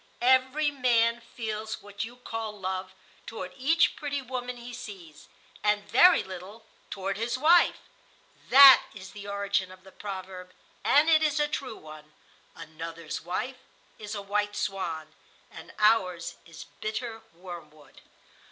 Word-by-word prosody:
Every 260 +4 +3
man 235 -3 +2
feels 220 -2 -6
what 205 0 -6
you 235 +2 -8
call 225 -4 -6
love 185 0 -4 0.3
toward 185 -5 -7
each 320 - +2
pretty 285 -2 -3
woman 250 -1 -5
he 240 +1 -9
sees, 195 -11 -10 0.4
and 210 0 +1
very 360 +1 +6
little 190 +4 -10 0.2
toward 195 0 -3
his 235 +3 -2
wife. 330 +5 +5 0.7
That 275 0 +10
is 190 -1 -10
the 205 -1 -10
origin 200 -2 -1
of 185 0 -15
the 190 - -15
proverb,—and 190 - -2
it 315 -1 +5
is 305 -1 +1
a 295 - +2
true 265 -6 -5
one,—'Another's 155 +1 -10
wife 245 +9 -3 0.4
is 210 0 -6
a 200 - -5
white 205 +1 -1
swan, 180 -6 -3 0.4
and - - -11
ours 190 -6 +2
is 165 -1 -11
bitter 225 +1 -4
wormwood. 170 -4 -12
210 Hz, 135 wpm, -28 LUFS, 185-245 Hz, 0.7 s, That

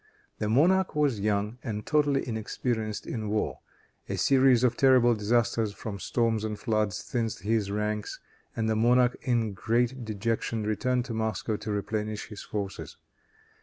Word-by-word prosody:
The 105 - -1
monarch 180 +10 +3
was 145 -7 +2
young 105 +3 -1
and 105 -4 -4
totally 145 -3 +2
inexperienced 110 -1 -3
in 110 -3 -4
war. 105 +1 -1 0.5
A - - -2
series 130 -3 +4
of 125 -1 +3
terrible 130 -2 +5
disasters 115 0 +1
from 100 -1 -6
storms 115 +1 0
and 105 -1 -3
floods 110 -5 -1
thinned 115 -3 -1
his 105 +1 -1
ranks, 105 +1 -2 0.4
and 110 -1 -1
the 110 - +1
monarch 120 +2 +4
in 115 -4 0
great 120 +5 0
dejection 110 +1 -2
returned 125 +4 0
to 120 - -5
Moscow 110 -1 -1
to 110 - -5
replenish 105 +1 -3
his 105 -2 -8
forces. 100 -2 -5
110 Hz, 150 wpm, -28 LUFS, 105-125 Hz, 0.5 s, terrible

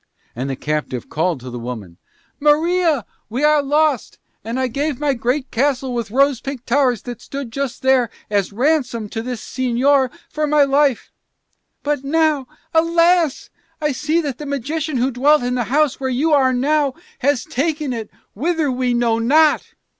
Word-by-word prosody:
And 130 +3 -3
the 135 - -2
captive 150 -4 -3
called 160 -1 0
to 125 0 -8
the 120 - -6
woman, 110 -8 -7 0.4
"Maria, 310 - +2 0.2
we 250 +6 -2
are 300 0 +5
lost. 290 -2 +1 0.3
And 230 +4 -3
I 260 - +1
gave 280 +2 -2
my 295 -2 +1
great 255 +3 -2
castle 260 0 0
with 235 -3 -3
rose 270 +2 +2
pink 270 -3 -6
towers 250 -4 +2
that 245 -3 -7
stood 275 -4 -6
just 270 -1 -4
here 260 -3 +3 0.2
as 200 -2 0
ransom 245 -2 0
to 225 - -4
this 245 -1 -5
señor 260 +1 +2 0.2
for 305 0 -2
my 295 0 +4
life. 275 -2 +1 0.7
But 290 -2 -1
now, 305 -2 +1 0.3
alas, 335 -1 +2 0.3
I 300 -1 0
see 305 +5 0
that 280 -5 -4
that 300 - -6
magician 285 +2 -2
who 255 +3 +1
dwelt 275 +3 +3
in 245 0 -1
the 245 -2 0
house 295 +1 +1
where 265 -1 -2
you 290 +5 +1
are 265 -3 +4
now 280 +2 +1 0.2
has 280 -1 +1
taken 300 0 -1
it 225 -3 -5 0.2
whither 315 - 0
we 250 -1 0
know 235 -1 +1
not." 300 +7 +3
270 Hz, 170 wpm, -19 LUFS, 240-295 Hz, 0.7 s, are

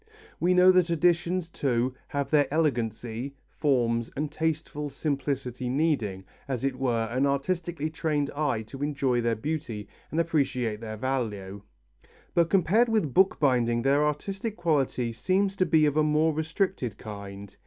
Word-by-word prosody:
We 180 +1 +3
know 180 +1 +7
that 180 -2 +3
editions, 170 +1 +1
too, 125 -3 0
have 145 -2 -3
their 145 -3 +3
elegancy, 125 -3 -1 0.2
forms 120 -5 +1
and 150 +1 -2
tasteful 155 -2 -2
simplicity 135 -3 -2
needing, 125 -10 0 0.2
as 130 -3 -3
it 135 -2 -2
were, 120 -4 +1
an 130 +5 0
artistically 155 +2 -1
trained 150 -3 -1
eye 145 -7 0
to 135 +5 -10
enjoy 140 -4 +1
their 115 -1 +1
beauty 120 -5 -4 0.2
and 160 - -1
appreciate 130 -9 0
their 110 -1 -6
value, 105 -6 -3 0.7
but 170 -1 +3
compared 200 +6 +3
with 210 - +1
bookbinding 125 -10 +3
their 140 +2 +3
artistic 195 +9 -2
quality 135 -8 0
seems 190 - +1
to 185 - +2
be 155 -2 +4
of 145 -1 +1
a 155 - +4
more 155 +1 +2
restricted 160 - -2
kind. 100 -2 -9
140 Hz, 145 wpm, -27 LUFS, 120-160 Hz, 0.7 s, know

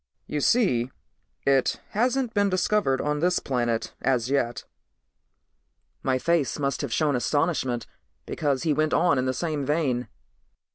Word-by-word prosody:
"You 150 - -3
see, 130 - +2 0.6
it 135 -2 +2
hasn't 245 +2 0
been 205 -1 +2
discovered 185 -6 +1
on 150 0 -1
this 180 +3 +2
planet 120 -3 -1
as 125 -1 +1
yet." 120 -4 0 1.4
My 130 -1 +1
face 165 0 +1
must 140 -1 -1
have 140 -5 -4
shown 150 +1 +1
astonishment 130 -2 0 0.4
because 140 -4 -1
he 155 - +2
went 155 +1 +1
on 165 -6 +3
in 130 - 0
the 130 - +1
same 155 0 -2
vein. 135 -4 0
145 Hz, 140 wpm, -26 LUFS, 130-170 Hz, 1.4 s, on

